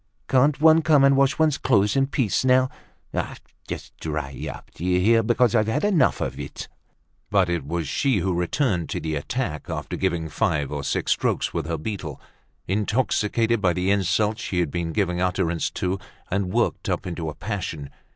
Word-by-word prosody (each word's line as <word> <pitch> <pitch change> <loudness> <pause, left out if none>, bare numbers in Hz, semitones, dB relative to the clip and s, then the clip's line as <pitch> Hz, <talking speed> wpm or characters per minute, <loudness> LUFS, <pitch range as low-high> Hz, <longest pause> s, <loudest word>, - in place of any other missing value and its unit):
Can't 140 +3 +3
one 160 +1 +6
come 150 -3 +4
and 140 0 +6
wash 140 +1 +3
one's 155 -3 +2
clothes 105 -5 +2
in 135 0 +3
peace 130 -7 0
now? 130 0 +4 1.0
Just - - -7
dry 75 -4 -4 0.2
up, - - -12
d'ye 90 +2 0
hear, 115 +5 +4
because 120 0 +2
I've 110 -2 +3
had 145 - 0
enough 180 -11 +3
of - - -3
it!" - - -7 0.6
But 95 -3 +3
it 85 -6 -2
was 85 -1 -2
she 135 - +1
who 95 0 0
returned 90 - 0
to - - -2
the 80 -1 -3
attack, 80 - -3
after - - -4
giving 80 -1 -1
five 75 -2 0
or 75 -1 -3
six 70 - -1
strokes - - 0
with - - -2
her 80 0 -2
beetle, 80 -3 -5 0.5
intoxicated 110 +2 +1
by 90 -3 +3
the 90 +2 0
insults 105 +3 +1
she 90 - -2
had 85 -5 0
been 85 -2 -2
giving 90 -1 0
utterance 90 -2 0
to, 95 +1 -2 0.3
and 95 -1 0
worked - - 0
up - - -1
into 85 -3 -4
a 75 - -7
passion. 85 -8 -5
100 Hz, 180 wpm, -24 LUFS, 85-125 Hz, 1.0 s, one